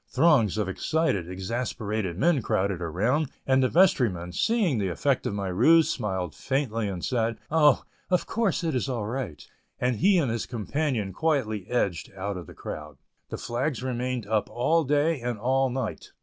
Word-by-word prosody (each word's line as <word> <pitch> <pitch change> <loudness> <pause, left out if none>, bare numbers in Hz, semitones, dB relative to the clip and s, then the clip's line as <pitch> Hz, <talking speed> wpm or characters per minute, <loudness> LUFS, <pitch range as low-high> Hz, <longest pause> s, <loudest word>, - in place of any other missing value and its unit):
Throngs 130 - +3
of 105 -3 0
excited, 100 - 0
exasperated 100 -1 -3
men 155 - +3
crowded 95 -3 0
around, 110 - 0 0.2
and 130 0 +3
the 130 - +3
vestryman, 115 - +3
seeing 200 - +1
the 100 - 0
effect 130 - 0
of 100 - -2
my 100 -1 -2
ruse, 155 - +4
smiled 95 - -3
faintly 125 -6 -1
and 95 -3 -4
said, 115 -2 0
"Oh, 150 -3 +5 0.3
of 180 -1 +2
course 220 -6 0
it 160 -2 0
is 130 +1 -1
all 120 -5 -2
right," 110 - -5 0.3
and 125 -2 +1
he 195 - +4
and 140 -9 +1
his 115 -2 -3
companion 120 -3 -2
quietly 110 - 0
edged 100 -9 -1
out 100 +1 -3
of 90 -4 -7
the - - -12
crowd. 75 -2 -7 0.3
The - - -4
flags 125 +1 -2
remained 125 -2 -2
up 105 0 0
all 160 +7 +1
day 145 +1 +1
and 120 -1 -2
all 130 +4 +1
night. 125 -2 -4
120 Hz, 175 wpm, -26 LUFS, 100-145 Hz, 0.3 s, Oh